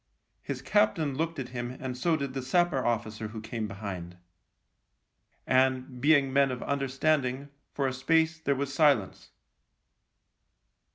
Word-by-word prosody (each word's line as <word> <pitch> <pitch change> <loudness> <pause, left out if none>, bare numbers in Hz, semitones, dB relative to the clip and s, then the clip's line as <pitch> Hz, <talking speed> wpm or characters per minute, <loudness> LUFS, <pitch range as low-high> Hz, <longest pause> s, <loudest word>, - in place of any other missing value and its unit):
His - - -5
captain 170 -9 +2
looked 165 +4 -2
at 130 -3 -5
him 125 0 -5
and 130 -1 -4
so 160 +6 +1
did 140 -3 -4
the 135 - -3
sapper 140 +1 +1
officer 110 -2 -2
who 110 +1 -7
came 110 0 -4
behind; 95 -4 -7 1.3
and, 130 -1 +1
being 140 -2 +4
men 140 0 +4
of 125 -1 -4
understanding, 140 0 0 0.3
for 140 - 0
a 130 - -2
space 160 +4 +2
there 140 -3 0
was 140 0 -3
silence. 140 - +2
135 Hz, 135 wpm, -29 LUFS, 125-145 Hz, 1.3 s, being